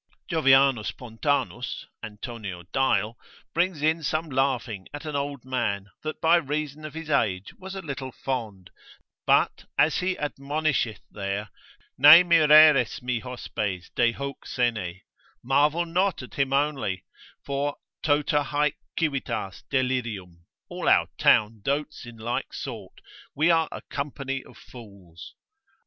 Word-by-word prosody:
Jovianus 135 -7 +4
Pontanus, 120 - -2 0.2
Antonio 105 -4 -7
Dial, 115 -4 +1 0.3
brings 170 -3 0
in 160 +1 +2
some 155 +1 -1
laughing 125 -7 -1
at 145 - -8
an 150 -2 -4
old 140 -2 -3
man, 105 -6 -2
that 155 0 -5
by 165 +1 +5
reason 150 -1 -3
of 155 0 -8
his 160 -1 -6
age 100 -8 0
was 190 +1 -8
a 190 - -6
little 135 -3 -5
fond, 110 -10 -5 0.6
but - - +3
as 155 - +4
he 185 0 -1
admonisheth 145 -5 -1
there, 100 0 -4 0.5
Ne 150 +6 +10
mireris 155 -7 +6
mi 125 -2 -1
hospes 105 -7 -4
de 120 -1 +3
hoc 140 +2 -6
sene, 105 -7 -1 0.4
marvel 150 +6 +2
not 180 -1 0
at 125 - -11
him 135 -1 0
only, 135 -10 0 0.4
for 140 +1 -1 0.3
tota 150 0 +2
haec 150 0 0 0.2
civitas 135 - -2
delirium, 115 -10 -2 0.2
all - - -2
our - - +4
town 105 0 +4
dotes 145 -1 -2
in 120 -1 -11
like 115 +2 -3
sort, - - -7 0.3
we 160 +4 +4
are 165 -1 +2
a - - -7
company 135 -1 -4
of - - -16
fools. 100 -8 -13
135 Hz, 130 wpm, -26 LUFS, 110-150 Hz, 0.6 s, Ne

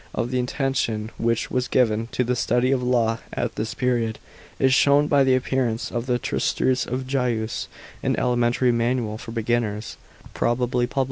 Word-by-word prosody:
f 115 - 0
The 130 0 0
attention 125 -4 -1
which 115 0 0
was 125 -1 0
given 115 -3 +2
to 125 - -1
the 125 +1 0
study 125 +2 +1
of 135 -2 +1
law 115 -2 +1
at 120 -1 -2
this 110 +1 -4
period 120 -3 0 0.4
is 130 -1 +3
shown 140 +2 +5
by 145 -2 +4
the 130 -1 +4
appearance 125 -3 -1
of 120 +1 -3
the 125 -1 +2
Tnstitutes 130 +1 0
of 130 +1 -3
Gaius, 120 -5 -1 0.3
an - - 0
elementary 120 0 +2
manual 115 -2 0
for 120 -2 -8
beginners, 115 -2 -2 0.4
prol> 120 0 +1
l>ly 125 - +1 0.2
* - - -7
Digest, - - -21
iv. - - +4
120 Hz, 185 wpm, -23 LUFS, 115-130 Hz, 0.4 s, shown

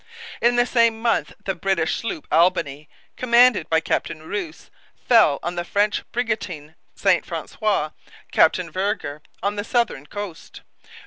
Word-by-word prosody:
In 240 +1 +4
the 245 0 +4
same 230 -2 +2
month 230 0 0
the 195 - 0
British 180 -3 0
sloop 225 -9 -5
Albany, 155 -3 +2 0.3
commanded 240 -7 +4
by 160 0 +3
Captain 155 0 -2
Rous, 175 -6 -6 0.4
fell 220 - +5
on 175 - -2
the 175 -1 -3
French 205 +4 +1
brigantine 205 -10 -3 0.2
St - - +2
Francois, 205 -8 -2 0.4
Captain 170 +1 +3
Vergor, 185 -6 -2 0.2
on 205 +1 -1
the 205 - -2
southern 235 - -1
coast. 205 -3 -8
195 Hz, 135 wpm, -22 LUFS, 160-225 Hz, 0.4 s, fell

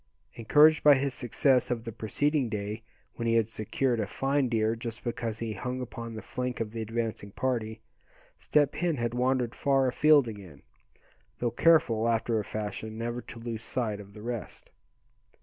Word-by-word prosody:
Encouraged 150 +7 +5
by 145 -1 +8
his 135 0 -1
success 125 +2 +2
of 120 -2 -2
the 115 - -5
preceding 135 +5 0
day, 105 +1 -4 0.4
when 115 - -2
he 115 - +3
had 115 -2 +3
secured 115 +3 -1
a 105 - -1
fine 135 +3 0
deer 110 -1 +1
just 115 -1 -7
because 115 -2 -3
he 115 -2 -3
hung 125 +5 -4
upon 115 -2 -6
the 110 - -7
flank 125 -1 -4
of 110 -2 -3
the 115 0 -5
advancing 110 -2 -3
party, 110 -1 -2 0.5
Step 145 -2 +2
Hen 175 -4 0
had 120 -1 -1
wandered 125 -1 +1
far 135 -2 +2
afield 145 +1 +5
again, 95 -10 -9 0.7
though 120 -1 -1
careful, 115 -9 +4
after 115 0 +1
a - - -2
fashion, 110 +1 -5
never 120 +1 -3
to 120 - -11
lose 115 -1 -5
sight 110 -4 -2
of 100 0 -12
the 105 - -10
rest. 120 -3 -6
115 Hz, 175 wpm, -29 LUFS, 110-130 Hz, 0.7 s, by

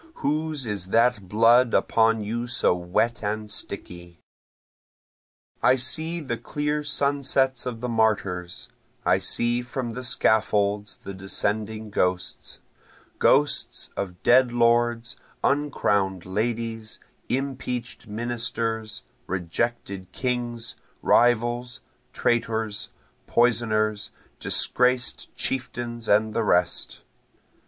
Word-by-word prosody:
Whose 155 -1 -1
is 105 -4 -3
that 115 -2 +2
blood 115 +3 +5
upon 115 -1 +3
you 120 +3 -3
so 120 -6 +2
wet 90 +7 -1
and 105 +1 -3
sticky?) 85 -1 -5 1.4
I 130 - +5
see 160 +7 +1
the 120 -6 -3
clear 150 +2 -2
sunsets 140 -3 +1
of 115 -2 -5
the 125 - -2
martyrs, 95 - 0 0.4
I - - +4
see 120 +1 +1
from 125 0 -4
the 125 +3 -6
scaffolds 105 -3 +1
the 100 - -6
descending 105 +3 -3
ghosts, 90 -2 -1 0.6
Ghosts 145 +1 +2
of 90 -2 -5
dead 125 0 +5
lords, 120 0 +2 0.3
uncrown'd 100 -10 +1
ladies, 115 +2 -3 0.3
impeach'd 125 -3 -3
ministers, 115 0 -2 0.2
rejected 95 +1 -3
kings, 120 -2 -2 0.3
Rivals, 120 +1 +2 0.3
traitors, 110 -3 -1 0.4
poisoners, 110 -3 +1 0.3
disgraced 125 0 +2
chieftains 120 -2 -3
and 110 +1 +3
the 115 - +1
rest. 90 -4 +1
115 Hz, 95 wpm, -25 LUFS, 105-125 Hz, 1.4 s, blood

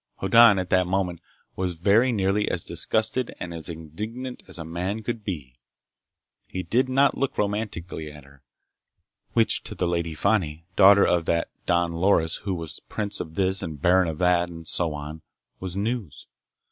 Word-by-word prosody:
Hoddan, 115 +1 +6
at 90 -1 -3
that 90 -1 +3
moment, 90 -2 -1 0.3
was 90 -2 -2
very 105 +9 +3
nearly 100 -1 +1
as 85 - -2
disgusted 115 +3 0
and 85 - -5
as 80 +1 -6
indignant 105 - -6
as - - -7
a 80 - -6
man 90 +6 -3
could 115 -1 -4
be. 75 - -5 0.9
He 95 - -4
did 130 +6 +1
not 135 +2 +3
look 140 0 -1
romantically 100 -7 -3
at 75 -1 -13
her—which 70 -3 -4
to - - -7
the 90 - 0
Lady 85 -2 -1
Fani, 85 -4 0
daughter 100 +1 +7
of 85 -2 +2
that 85 0 0 0.2
Don 85 -1 +2
Loris 85 -1 +2
who 100 -2 -3
was 80 -2 -5
prince 105 -1 -3
of 80 -2 -6
this 95 0 +1
and 80 -3 -6
baron 90 +4 +4
of 80 -2 -3
that 90 0 +2
and 80 -1 -10
so 80 -2 0
on, 75 +2 -7 0.4
was 95 0 -4
news. 105 - -3
90 Hz, 170 wpm, -25 LUFS, 80-105 Hz, 0.9 s, daughter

